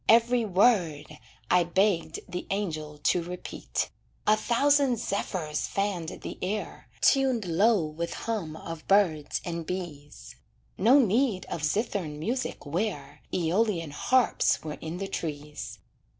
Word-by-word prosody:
Every 235 +1 +5
word 175 -8 +2 0.3
I 180 -1 +6
begged 175 -2 +1
the 180 - -5
angel 155 -7 -3
to 180 - +3
repeat. 180 +1 -4 0.3
A 215 - +6
thousand 265 +3 +3
zephyrs 180 -8 -2
fanned 195 -5 -2
the - - -6
air, 205 +4 -4
Tuned 260 -6 +3
low 190 +2 +3
with 160 +2 -4
hum 200 -9 -2
of 165 0 -8
birds 175 -7 +2
and 170 -1 -3
bees, 160 -5 -7 0.4
No 235 +9 +6
need 230 -4 +2
of 165 - -3
zithern 170 -2 -1
music 235 - -3
where 180 +8 -3
Æolian 175 -1 +1
harps 255 - +2
were 155 -1 -6
in 160 +2 -5
the 195 +1 -3
trees. 150 -4 -5
180 Hz, 125 wpm, -28 LUFS, 160-220 Hz, 0.4 s, I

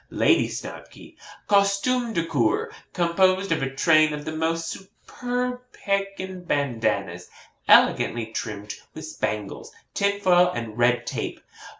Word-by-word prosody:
'LADY - - +3
SNOBKY. - - -9 0.3
'Costume 205 +5 +2
de 165 -4 0
Cour, 135 -9 0 0.2
composed 185 +2 +2
of 160 -3 +1
a 135 - -1
train 155 +3 +3
of 150 0 -6
the - - -3
most 165 +1 -1
superb 245 +7 -5
Pekin 195 -2 -3
bandannas, 110 - -1 0.4
elegantly 120 -1 +4
trimmed 105 -2 -6 0.2
with - - -7
spangles, 105 -2 -4 0.2
tinfoil, 200 -3 +3
and 115 -2 -5
red 120 0 +3
tape. - - -4
165 Hz, 115 wpm, -24 LUFS, 120-195 Hz, 0.4 s, elegantly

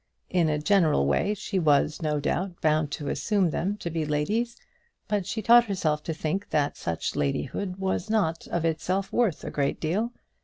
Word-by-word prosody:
In 175 -3 +3
a 150 - +1
general 155 - +3
way 195 - +1
she 200 -1 -2
was, 150 0 +2
no 150 -2 0
doubt, 175 +5 -2
bound 155 -1 +2
to 145 - -4
assume 180 +5 +1
them 195 +7 -1
to 170 -5 -5
be 160 0 -1
ladies; 205 +11 -1 0.5
but 205 -4 -1
she 220 +1 -3
taught 240 +3 +7
herself 160 -7 0
to 165 - -2
think 160 +6 -2
that 145 -2 +1
such 85 -1 -3
ladyhood 140 - -2
was 190 +1 -2
not 165 -7 0
of 170 -1 -1
itself 185 +4 -1
worth 215 -11 +1
a - - -5
great 140 -1 -1
deal. 200 +9 -1
170 Hz, 185 wpm, -27 LUFS, 150-200 Hz, 0.5 s, taught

